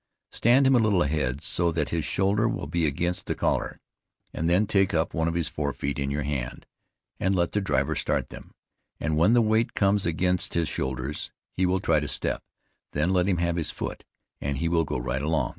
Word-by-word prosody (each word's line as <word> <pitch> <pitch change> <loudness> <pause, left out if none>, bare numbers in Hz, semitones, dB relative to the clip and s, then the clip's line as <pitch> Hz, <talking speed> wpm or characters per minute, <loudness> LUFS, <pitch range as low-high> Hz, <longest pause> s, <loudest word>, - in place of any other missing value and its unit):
Stand 125 +4 +4
him 135 0 +5
a - - +5
little 105 -6 +3
ahead, 70 -2 -1
so 85 -1 +1
that 80 -3 -1
his 85 -2 -1
shoulders 105 +7 +1
will - - -4
be 85 -2 0
against 85 +5 -2
the - - -1
collar, - - -1 0.5
and 80 +1 -1
then 90 +5 +4
take 95 -3 +2
up 80 0 0
one 80 0 0
of 85 - -1
his 85 -3 0
fore 75 -2 -2
feet 70 0 -3
in 70 0 -1
your 70 +1 -1
hand, 70 -4 -4 0.5
and 95 +1 +1
let 85 -1 +1
the 105 - 0
driver 95 - 0
start - - -1
them, - - -12 0.4
and 80 - -1
when 85 +9 +4
the 120 -1 +5
weight 110 +1 +1
comes 100 -2 +2
against 90 +2 0
his 85 -2 +1
shoulders, 65 0 -3 0.3
he 95 0 +2
will 95 +1 +1
try 80 -3 +2
to 75 - -3
step; - - -2 0.5
then 75 +5 +1
let 90 -1 +2
him 95 -3 +2
have 85 0 0
his 80 - -1
foot, - - -5 0.4
and 70 -1 -2
he 85 - 0
will 85 -1 +2
go - - -2
right 65 +2 -2
along. 75 -4 0
85 Hz, 220 wpm, -26 LUFS, 75-95 Hz, 0.5 s, him